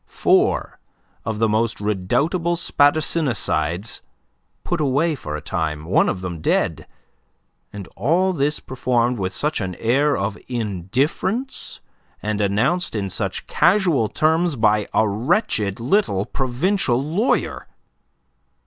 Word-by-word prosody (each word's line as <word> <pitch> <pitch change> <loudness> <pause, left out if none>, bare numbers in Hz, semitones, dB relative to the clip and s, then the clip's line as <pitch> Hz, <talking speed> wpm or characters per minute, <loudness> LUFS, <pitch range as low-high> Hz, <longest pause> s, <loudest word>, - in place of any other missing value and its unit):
Four - - +1 0.5
of 110 0 -2
the 115 +1 +2
most 110 +1 0
redoubtable 125 - 0
spadassinicides 140 - +1 0.6
put 175 -3 -2
away 150 +4 +2
for 75 - -6
a - - -8
time, 80 -4 -3
one 90 - +3
of 90 - -3
them 85 -4 -5
dead - - 0 0.8
and 100 -2 -8
all 185 +5 +2
this 150 -1 0
performed 125 -2 0
with 95 -1 -1
such 150 +6 -1
an 95 -2 -3
air 135 - +2
of 100 +1 -3
indifference 125 - -2 0.4
and 105 0 -2
announced 110 - +1
in 100 -3 -2
such - - -3
casual 170 - +3
terms 160 +1 +1
by 105 -3 +2
a 110 - +3
wretched 105 - 0
little 120 - +1
provincial 135 +1 0
lawyer! 165 - -1
120 Hz, 120 wpm, -21 LUFS, 100-155 Hz, 0.8 s, one